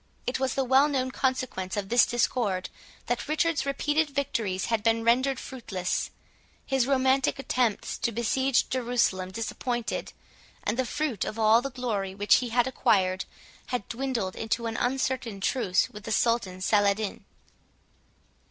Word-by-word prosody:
It 250 - -1
was 265 -1 0
the 270 - +1
well 265 +3 +5
known 260 -3 -1
consequence 255 -9 -2
of 195 -1 -3
this 240 +1 +5
discord 230 -6 0 0.4
that 245 +3 -2
Richard's 305 -2 +1
repeated 295 +2 +1
victories 230 -9 -1
had 225 -2 0
been 225 +1 +2
rendered 255 +3 +2
fruitless, 195 -8 -3 0.6
his 265 -2 +1
romantic 265 0 +2
attempts 250 -5 -1
to 235 - 0
besiege 245 +4 +1
Jerusalem 235 -7 0
disappointed, 230 +3 -3 0.5
and 210 - 0
the 260 - +1
fruit 290 -9 -1
of 215 - -4
all 220 +1 +5
the 275 - -3
glory 220 -7 -3
which 205 +1 +4
he 245 - -2
had 240 +1 +2
acquired 195 -8 +1 0.4
had 245 -5 -3
dwindled 235 -6 -2
into 225 +1 -2
an 225 0 -3
uncertain 250 -3 -1
truce 195 -2 +1
with 210 0 -10
the 225 - -4
Sultan 220 -5 +1
Saladin. 205 +1 +1
240 Hz, 145 wpm, -27 LUFS, 210-260 Hz, 0.6 s, well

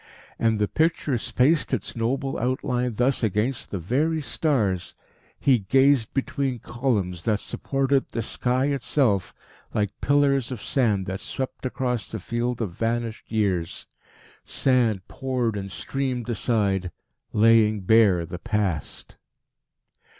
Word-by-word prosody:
And 115 -1 +2
the 105 0 +1
picture 160 -2 +1
spaced 140 +7 +2
its - - -7
noble 130 +3 -1
outline 125 0 -1
thus 125 +4 +1
against 110 +4 0
the 100 - -3
very 140 - 0
stars. 115 - 0 0.4
He 130 -4 +4
gazed 130 +3 +3
between 135 -1 -1
columns, 110 -8 -2
that 105 -2 +2
supported 135 +3 0
the 115 - -3
sky 125 +4 0
itself, 120 - +1 0.4
like 105 -2 +1
pillars 140 -3 +2
of 125 - -4
sand 105 -5 +1
that 95 0 -4
swept 130 0 -4
across 125 -3 -2
the 110 - -5
field 120 +4 -2
of 100 - -3
vanished 115 +3 -3
years. 95 -6 -1 0.6
Sand 115 -7 +1
poured 130 -5 -2
and 100 -1 -5
streamed 125 +7 -3
aside, 100 -5 0 0.4
laying 110 -1 +4
bare 95 -4 +4
the 90 +2 -7
Past. 105 - -3
115 Hz, 125 wpm, -25 LUFS, 105-130 Hz, 0.6 s, He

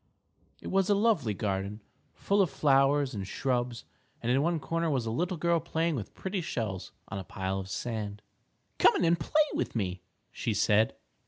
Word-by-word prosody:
_ - - -44 0.6
It - - -5
was 195 0 +2
a 205 - +5
lovely 200 - +2
garden, 100 +1 -2 0.4
full 200 +1 +2
of 185 - +3
flowers 140 0 +3
and 100 -3 -4
shrubs, 125 0 -1 0.3
and 120 - -1
in 135 +2 +3
one 165 +1 +1
corner 165 +3 -1
was 130 -6 0
a 110 - -2
little 175 - -1
girl 170 +1 +2
playing 165 0 -1
with 110 -7 -6
pretty 190 0 -3
shells 110 - -3 0.2
on 100 - -4
a - - -5
pile 95 +1 -3
of 95 0 -6
sand. 105 -1 -4 0.6
"Come - - +6
in - - +2
and 170 +1 +3
play 300 - +3
with - - -2
me," 95 -5 -2 0.3
she - - -2
said. 110 +2 +3
130 Hz, 190 wpm, -30 LUFS, 105-170 Hz, 0.6 s, Come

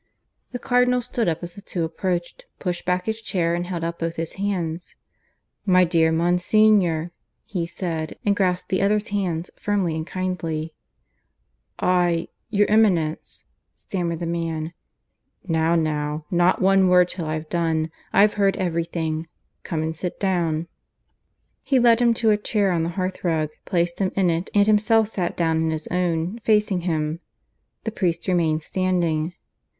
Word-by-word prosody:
The 245 - -3
Cardinal 250 0 +2
stood 230 -1 -1
up 165 +1 -3
as 175 0 -6
the 200 - -11
two 175 -3 -3
approached, 175 - -3
pushing 175 -2 -3
back 180 0 +1
his 220 0 -3
chair, 175 -6 0
and 175 +1 -2
held 175 -2 -4
out 170 0 -3
both 165 0 -2
his 165 -1 -4
hands. 180 -4 -3 0.7
"My 185 -2 +5
dear 165 -2 +3
Monsignor," 175 0 +3 0.3
he 175 -4 -3
said, 165 -2 -4
and 205 -1 +3
grasped 180 -2 0
the 185 - +1
other's 210 +2 +1
hands 180 -4 -2
firmly 200 -5 0
and 160 +1 -4
kindly. 165 -4 -3 1.0
"I... 175 -2 +1 0.2
your 205 -1 +3
Eminence.. 185 -8 +1
." - - -52
stammered 170 -3 -3
the 170 - -4
man. 165 -1 -3 0.7
"Now, 165 0 +2
now; 150 -1 -1
not 175 +1 +3
one 195 0 +5
word 180 -1 +5
till 170 -4 -5
I've 155 0 -3
done. 160 -2 0 0.2
I've 205 +1 +5
heard 200 -1 +2
everything. 165 -2 -2 0.3
Come 160 -2 -3
and 160 0 -3
sit 175 +2 -5
down." 170 -4 0 0.9
He 265 0 +1
led 240 -1 +5
him 235 -1 +4
to 225 -1 +3
a 210 - +3
chair 205 -2 +1
on 170 -2 +1
the 165 - -1
hearth 185 0 -3
rug, 160 -3 +1 0.2
placed 170 -1 0
him 190 -2 +1
in 185 -3 +3
it, 165 +3 -2
and 205 0 +5
himself 215 +1 +3
sat 180 -5 -3
down 165 -2 +1
in 160 0 +1
his 160 -1 -3
own, 180 +3 -1
facing 210 -4 +2
him. 160 -2 -1 0.6
The 225 - -3
priest 175 -5 -1
remained 165 -4 +1
standing. 175 -2 0
175 Hz, 160 wpm, -23 LUFS, 165-195 Hz, 1.0 s, My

